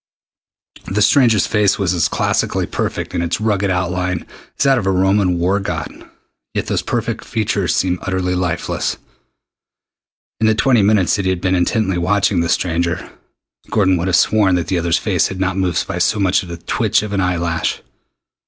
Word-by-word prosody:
The 105 +2 -1
stranger's 115 -8 +4
face 105 -2 +2
was 95 -3 0
as 85 -4 +2
classically - - 0
perfect - - -4
in - - -1
its 85 +2 -1
rugged 105 -2 0
outline 90 -1 -1 0.3
as - - +1
that 135 -2 +4
of 95 - -4
a - - +3
Roman 95 -1 +2
war 90 +4 +1
god, 85 -6 -6 0.5
yet - - -1
those - - -1
perfect - - -3
features 105 -4 -1
seemed 90 -1 0
utterly 95 -1 -1
lifeless. 90 -2 -2 1.4
In 110 - +2
the 110 - +3
twenty 120 0 +3
minutes 100 -3 +3
that 100 - -2
he - - +2
had 95 -1 -1
been 95 0 0
intently 95 +1 +1
watching 95 +1 +1
the 85 - -1
stranger, 85 -1 -1 0.6
Gordon 95 -3 +2
would 85 +2 -2
have 90 - +2
sworn 100 -4 +3
that 85 -2 -2
the 90 - +1
other's 85 0 +1
face 95 -6 +1
had 95 - -7
not 95 -1 0
moved 95 -3 0
by - - -4
so - - +2
much 95 -2 +2
as 90 - -10
the 85 - -6
twitch 110 +5 0
of 105 -1 -5
an 100 - +1
eye 90 -1 0
lash. 85 -1 -2
95 Hz, 190 wpm, -18 LUFS, 90-105 Hz, 1.4 s, stranger's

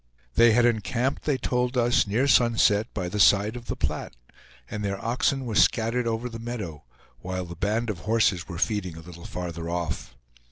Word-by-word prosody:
They 115 -1 +6
had 120 +1 +4
encamped, 120 +3 0
they 145 -3 +1
told 125 0 -1
us, 120 -1 +3
near 115 +7 +1
sunset, 115 -4 +4
by 95 -3 -3
the 105 +4 -4
side 100 +3 +4
of 120 -1 -9
the - - -2
Platte, - - -3 0.5
and 105 -1 -5
their 100 -1 -2
oxen 125 +4 0
were 115 - -4
scattered 115 +3 +2
over 115 +2 -2
the 115 -1 -7
meadow, 105 - -6 0.3
while 95 0 -4
the 85 0 -9
band 110 +5 -1
of 95 - -8
horses 105 -3 +1
were 85 -3 -6
feeding 95 -3 -1
a - - -9
little 85 +1 -12
farther 85 -2 -5
off. 85 -2 -4
110 Hz, 190 wpm, -26 LUFS, 90-120 Hz, 0.5 s, They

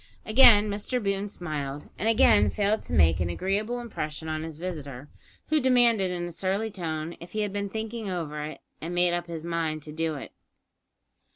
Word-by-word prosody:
Again 215 -2 +7
Mr 205 +5 -1
Boone 200 0 -1
smiled, 150 -6 -5
and 220 - +1
again 215 -2 +5
failed 210 +1 +1
to - - -8
make 80 +2 +4
an 85 -1 0
agreeable 205 - -1
impression 160 - -5
on 155 0 -2
his 160 -1 -7
visitor, 150 -6 -6 0.4
who 310 0 +4
demanded 240 -7 +4
in 175 -1 -3
a 175 - -5
surly 195 +5 -1
tone 165 -3 -4
if 170 +1 -11
he 215 - -1
had 205 -2 -2
been 200 0 -2
thinking 220 0 -4
over 155 -5 -3
it, 155 +1 -6 0.2
and 170 +2 -4
made 175 0 +3
up 175 0 -2
his 165 -2 -6
mind 165 -3 -2
to 150 - -8
do 160 0 -2
it. 140 - -8
175 Hz, 190 wpm, -27 LUFS, 155-210 Hz, 0.4 s, Again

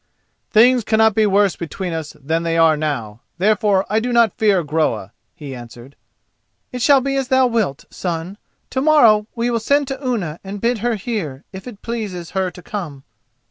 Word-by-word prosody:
"Things 240 +2 +5
cannot 220 0 +3
be 215 +1 +3
worse 200 -1 +3
between 175 +1 -5
us 160 -2 -5
than 160 +4 -1
they 165 0 -1
are 165 -1 +5
now, 120 -8 -4 0.2
therefore 200 0 +2
I 215 +2 +1
do 245 +2 -2
not 235 -4 +3
fear 200 -5 +2
Groa," 145 -10 -1 0.2
he 145 -3 -8
answered. 120 +2 -11 0.8
"It 250 - -5
shall 275 +2 +5
be 275 +1 -2
as 270 -2 -1
thou 260 -1 +4
wilt, 220 - -1
son; 175 +3 -4 0.3
to 260 - -1
morrow 235 -9 +5
we 235 +1 0
will 230 - 0
send 280 +5 +1
to 270 +1 -5
Unna 200 - -2
and 200 +1 -6
bid 235 +2 0
her 235 +2 0
here, 185 - -4
if 190 +4 -9
it 215 -5 -11
pleases 205 -8 -5
her 190 -1 -1
to 180 0 -14
come." 160 -10 -6
200 Hz, 185 wpm, -19 LUFS, 160-235 Hz, 0.8 s, Things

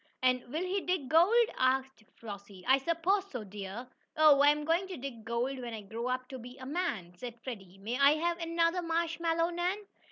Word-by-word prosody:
"And 255 -1 +3
will 315 +5 -1
he 380 +2 -1
dig 360 -8 -1
gold?" 390 - +6
asked 260 -2 +1
Flossie. 200 -4 -10
"I 265 +1 +6
suppose 345 +7 0
so, 245 -5 -5
dear!" 205 +4 -7 0.3
"Oh, 305 -2 +7
I'm 295 +1 +4
going 335 +4 +1
to 375 - -6
dig 250 -4 -7
gold 240 +4 -2
when 240 -2 -5
I 215 - -6
grow 235 +5 -2
to 260 - -7
be 245 +2 -10
a 260 - -9
man," 235 - -2
said 240 +5 -8
Freddie. 195 -7 -8
"May 225 +7 -4
I 280 +1 +7
have 340 +2 -1
another 335 +1 +1
marshmallow, 335 0 0
Nan?" 350 +3 0
275 Hz, 190 wpm, -31 LUFS, 235-335 Hz, 0.3 s, Oh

